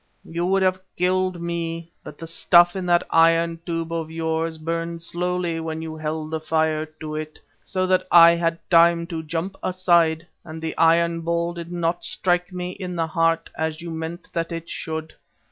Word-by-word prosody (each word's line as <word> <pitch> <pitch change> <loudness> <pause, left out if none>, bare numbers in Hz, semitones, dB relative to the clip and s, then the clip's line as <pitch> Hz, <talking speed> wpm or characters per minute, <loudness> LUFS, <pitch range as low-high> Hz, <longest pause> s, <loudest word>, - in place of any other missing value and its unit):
"You 170 +2 -2
would 195 0 +2
have 185 0 +1 0.2
killed 185 0 +1
me, 170 -1 -4
but 150 - -10
the 165 - -8
stuff 175 +2 +4
in 185 -2 -3
that 175 0 +4
iron 165 0 +4
tube 165 -1 -3
of 165 -1 -3
yours 160 0 -2
burned 165 +1 -3
slowly 175 -1 -1
when 160 0 -4
you 160 -1 -6
held 155 0 -4
the 160 - -1
fire 155 0 0
to 155 -1 -5
it, 155 0 -6 0.2
so 185 +9 -1
that 185 0 +1
I 170 -1 +9
had 165 -1 0
time 170 0 +5
to 165 -2 -5
jump 165 +5 -4
aside 170 -3 +2 0.2
and 160 0 -8
the 160 0 -4
iron 165 0 +3
ball 170 +1 -1
did 170 0 -8
not 175 0 -1
strike 180 0 0
me 180 0 -4
in 185 -1 -6
the 165 -1 0
heart 165 0 0
as 160 -1 -2
you 170 -1 -6
meant 160 +2 -6
that 165 0 -2
it 165 0 -6
should. 160 0 -5
165 Hz, 185 wpm, -23 LUFS, 160-175 Hz, 0.2 s, I